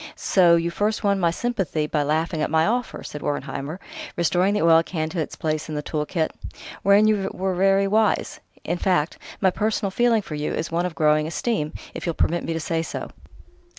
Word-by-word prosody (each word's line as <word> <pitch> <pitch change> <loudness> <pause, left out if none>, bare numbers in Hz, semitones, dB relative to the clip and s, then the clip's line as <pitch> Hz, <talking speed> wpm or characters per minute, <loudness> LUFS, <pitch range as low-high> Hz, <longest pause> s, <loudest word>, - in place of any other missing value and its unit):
So 175 -3 +4
you 170 0 0
first 210 +4 -1
won 200 -1 +2
my 170 -2 +3
sympathy 185 -6 -1
by 150 0 0
laughing 155 +2 0
at - - 0
my 160 +1 +3
offer," 245 +2 -2
said 150 - -7
Wertheimer, 145 +2 -4 0.4
restoring 180 +4 +2
the 210 - +1
oil 165 -1 +6
can 160 -2 -3
to 175 - -4
its 155 - -3
place 155 0 -2
in 155 - -4
the 150 - -3
tool 150 -1 -2
kit; 160 -3 -1 0.5
"wherein 200 +2 +5
you 200 -3 +1
were 190 0 -2
very 195 +2 +3
wise.... 215 +2 +1 0.2
In 175 - -2
fact, 175 -5 +1 0.2
my 190 -2 +4
personal 210 0 -1
feeling 230 0 +2
for 155 - -8
you 150 0 -2
is 165 - -3
one 170 +2 +1
of 170 - -8
growing 155 0 +3
esteem, 165 -3 -2 0.2
if - - -6
you'll 170 - -1
permit 175 +1 +1
me - - -3
to 165 - -2
say 165 +1 -1
so. 165 - -6
170 Hz, 210 wpm, -23 LUFS, 155-195 Hz, 0.5 s, oil